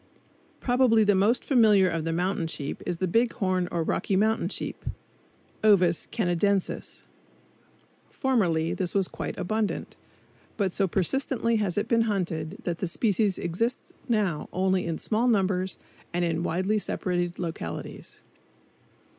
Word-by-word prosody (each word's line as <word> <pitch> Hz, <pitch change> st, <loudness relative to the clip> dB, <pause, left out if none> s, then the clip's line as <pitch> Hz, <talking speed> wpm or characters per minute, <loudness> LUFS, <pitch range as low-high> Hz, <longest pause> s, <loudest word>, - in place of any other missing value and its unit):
Probably 245 Hz, -3 st, +4 dB
the 205 Hz, -1 st, +4 dB
most 205 Hz, +6 st, +2 dB
familiar 215 Hz, -8 st, +5 dB
of 165 Hz, -2 st, -2 dB
the 165 Hz, -, 0 dB
mountain 175 Hz, 0 st, 0 dB
sheep 145 Hz, -3 st, -5 dB
is 175 Hz, -, -1 dB
the 185 Hz, -, -1 dB
big 230 Hz, +6 st, +2 dB
horn 185 Hz, -2 st, 0 dB
or 170 Hz, -1 st, 0 dB
Rocky 190 Hz, -, 0 dB
Mountain 220 Hz, +3 st, +2 dB
sheep -, -, -4 dB, 0.8 s
(Ovis 185 Hz, -6 st, +4 dB
canadensis). 195 Hz, -1 st, -1 dB, 1.1 s
Formerly 175 Hz, -, +1 dB
this 185 Hz, -1 st, -2 dB
was 195 Hz, -2 st, +2 dB
quite -, -, -5 dB
abundant, 215 Hz, +3 st, -2 dB, 0.6 s
but 195 Hz, -4 st, 0 dB
so 195 Hz, -, +1 dB
persistently 230 Hz, -, 0 dB
has 205 Hz, -4 st, -1 dB
it 205 Hz, -, 0 dB
been 230 Hz, -1 st, +2 dB
hunted 175 Hz, -3 st, -2 dB
that 170 Hz, -2 st, -3 dB
the 185 Hz, -, -1 dB
species 200 Hz, +1 st, +1 dB
exists 225 Hz, +9 st, -2 dB, 0.2 s
now 205 Hz, -9 st, 0 dB
only 185 Hz, -1 st, +1 dB
in 165 Hz, -1 st, -2 dB
small 230 Hz, +3 st, 0 dB
numbers 190 Hz, -4 st, +1 dB, 0.4 s
and 175 Hz, 0 st, +1 dB
in 165 Hz, -1 st, -1 dB
widely 185 Hz, +5 st, 0 dB
separated 175 Hz, -3 st, -2 dB
localities. 160 Hz, -, -6 dB
190 Hz, 140 wpm, -27 LUFS, 175-215 Hz, 1.1 s, familiar